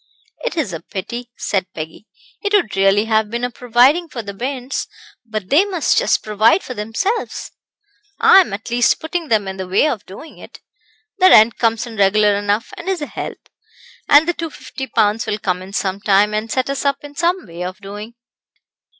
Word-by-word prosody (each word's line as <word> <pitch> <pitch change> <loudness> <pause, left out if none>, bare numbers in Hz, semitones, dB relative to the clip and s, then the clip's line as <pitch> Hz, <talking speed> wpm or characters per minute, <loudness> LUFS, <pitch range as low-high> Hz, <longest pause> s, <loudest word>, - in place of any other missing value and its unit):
"It - - -3
is 275 - -1
a 165 - -4
pity," 235 +7 -7
said 190 -2 -2
Peggy. 160 +6 -8 0.3
"It 405 -1 -2
would 370 - +2
really 195 +2 +3
have 220 -1 +1
been 235 +2 -4
a 245 - -1
providing 250 +9 +3
for 235 -5 -6
the 200 -1 -7
bairns; 255 +4 -4 0.4
but 215 -5 -6
they 305 +7 +6
must 375 -5 0
just - - +2
provide 215 - +3
for 255 - -6
themselves. 230 - -3 0.7
I 380 - +7
am, 375 - +2
at 210 +4 -6
least, 240 0 +3
putting 320 +1 -4
them 215 -6 +1
in 190 0 -5
the 190 -1 -5
way 195 +11 +3
of 245 -9 -2
doing 250 - -12
it. - - -13 0.6
The 370 0 +7
rent 220 +2 +6
comes 230 -1 +1
in 230 -2 -9
regular 205 +1 +4
enough, 205 +2 -1
and 345 - -5
is 365 -5 -1
a - - -2
help; - - -7 0.6
and 295 +3 +6
the 345 - +1
250 315 -5 -7
pounds 215 -1 +1
will 210 - -1
come 185 -3 -2
in 190 +1 -10
some 195 0 -2
time, 205 +1 +3
and 215 +1 -2
set 260 +1 0
us 275 - -3
up 280 0 0
in 290 0 -10
some 345 +4 0
way 170 +1 -7
of 185 +1 -5
doing." 210 +4 -9
225 Hz, 200 wpm, -18 LUFS, 205-290 Hz, 0.7 s, I